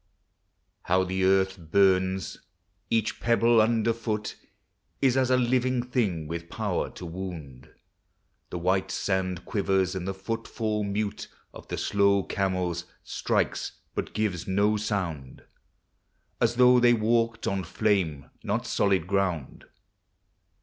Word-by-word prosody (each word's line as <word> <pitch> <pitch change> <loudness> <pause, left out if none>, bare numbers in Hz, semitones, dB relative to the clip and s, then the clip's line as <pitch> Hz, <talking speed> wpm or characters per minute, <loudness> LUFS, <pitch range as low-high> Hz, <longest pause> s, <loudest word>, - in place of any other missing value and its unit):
How 95 +1 +2
the 95 +1 -1
earth 95 0 +2
burns! 95 +2 +2 0.5
Each 110 -1 0
pebble 115 -1 +4
under 115 +1 +2
foot 110 -2 -3 0.6
Is 130 -2 +3
as 130 -1 +2
a 130 - +4
living 125 0 +1
thing 105 -11 -1
with 85 +1 -6
power - - -2
to 90 - -8
wound. 80 -7 -7 0.8
The - - -4
white 95 +2 +1
sand 95 -2 -1
quivers, 95 -3 +1
and 95 -1 -4
the 95 - -3
footfall 110 +1 -3
mute 100 0 -3 0.3
Of - - -12
the - - -4
slow 100 -1 +2
camels 90 -3 -1 0.2
strikes - - -1 0.2
but - - -4
gives 100 -5 -1
no 100 +3 +2
sound, 90 -11 -3 1.0
As - - +2
though 125 0 +6
they 120 0 +5
walked 115 +1 +1
on 95 -1 -1
flame, 90 -11 0 0.2
not - - -1
solid 95 -5 +1
ground 90 -6 -2
100 Hz, 125 wpm, -27 LUFS, 90-115 Hz, 1.0 s, though